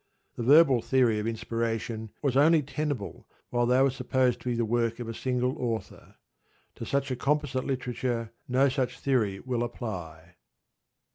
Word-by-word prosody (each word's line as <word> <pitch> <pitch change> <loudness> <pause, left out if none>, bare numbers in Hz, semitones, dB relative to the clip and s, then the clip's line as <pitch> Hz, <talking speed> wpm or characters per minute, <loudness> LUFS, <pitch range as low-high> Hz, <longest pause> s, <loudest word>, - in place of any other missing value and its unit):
_ - - -46
The - - -5
verbal 135 0 +6
theory 120 -5 +2
of 105 - -2
inspiration 115 -1 -3
was 135 -3 +1
only 155 +2 +5
tenable 145 -6 -4 0.2
while 120 0 +1
they 125 +1 +4
were 135 - +3
supposed 130 -1 0
to 125 - -3
be 120 - 0
the 115 0 0
work 115 +1 0
of 120 - -5
a 115 - -4
single 125 +2 -1
author. 115 -3 -5 0.6
_To - - -6
such 140 -1 0
a - - 0
composite 140 0 0
literature 125 -3 -2 0.2
no 130 +2 +3
such 130 -1 -2
theory 110 -8 0
will 125 -2 -2
apply. 90 -9 -6
125 Hz, 165 wpm, -28 LUFS, 115-130 Hz, 0.6 s, verbal